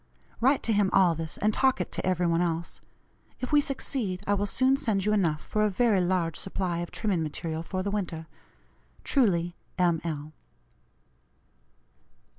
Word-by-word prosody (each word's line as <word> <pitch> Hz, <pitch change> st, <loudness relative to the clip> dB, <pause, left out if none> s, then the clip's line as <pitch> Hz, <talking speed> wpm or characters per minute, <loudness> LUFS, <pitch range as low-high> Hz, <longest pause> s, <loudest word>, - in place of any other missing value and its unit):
Write 265 Hz, +4 st, +3 dB
to 225 Hz, -, +1 dB
him 205 Hz, -2 st, +3 dB
all 185 Hz, -3 st, +5 dB
this, 160 Hz, -1 st, -5 dB
and 215 Hz, +1 st, +1 dB
talk 265 Hz, -1 st, +2 dB
it 180 Hz, -, -3 dB
to -, -, -2 dB
every 180 Hz, -1 st, +1 dB
one 170 Hz, 0 st, +2 dB
else. 170 Hz, -1 st, -2 dB, 0.6 s
If 255 Hz, -, -4 dB
we 295 Hz, -1 st, +6 dB
succeed 240 Hz, -9 st, -2 dB
I 205 Hz, -, +2 dB
will 205 Hz, 0 st, 0 dB
soon 260 Hz, +6 st, +3 dB
send 215 Hz, -8 st, 0 dB
you 210 Hz, -, +2 dB
enough 165 Hz, -7 st, +1 dB
for 215 Hz, -, 0 dB
a 210 Hz, -, +3 dB
very 210 Hz, -1 st, +2 dB
large 175 Hz, -3 st, 0 dB
supply 185 Hz, -3 st, -2 dB
of 175 Hz, -, -4 dB
trimming 200 Hz, -6 st, -1 dB
material 160 Hz, +1 st, -3 dB
for 185 Hz, +3 st, -3 dB
the 200 Hz, -, -2 dB
winter. 170 Hz, -6 st, -3 dB, 0.8 s
Truly, 175 Hz, -10 st, +2 dB, 0.2 s
"M. 170 Hz, -3 st, +2 dB
L." 155 Hz, -2 st, -5 dB
185 Hz, 170 wpm, -28 LUFS, 170-215 Hz, 0.8 s, we